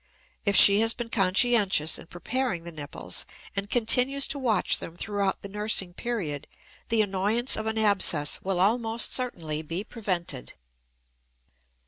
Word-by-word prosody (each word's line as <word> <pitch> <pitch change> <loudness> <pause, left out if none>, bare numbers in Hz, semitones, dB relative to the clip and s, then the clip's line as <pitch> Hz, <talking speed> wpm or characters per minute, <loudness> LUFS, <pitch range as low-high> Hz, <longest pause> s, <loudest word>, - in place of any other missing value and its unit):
If 200 - +2
she 200 +1 +8
has 225 +1 +2
been 235 -1 -6
conscientious 195 -4 +2
in - - -12
preparing 220 0 -3
the 170 - -7
nipples 145 - -5 0.3
and 200 0 -3
continues 250 +4 +3
to 280 - -1
watch 225 -8 0
them 165 - -8
throughout 200 +1 -2
the - - -5
nursing 205 -3 -1
period, 180 - -4 0.4
the 225 -1 +3
annoyance 205 +5 0
of 220 0 -4
an 220 0 -2
abscess 195 -8 +2
will 190 -2 -2
almost 225 +3 +2
certainly 165 - -1
be 165 +5 -4
prevented. 180 - -3
200 Hz, 140 wpm, -26 LUFS, 175-230 Hz, 0.4 s, she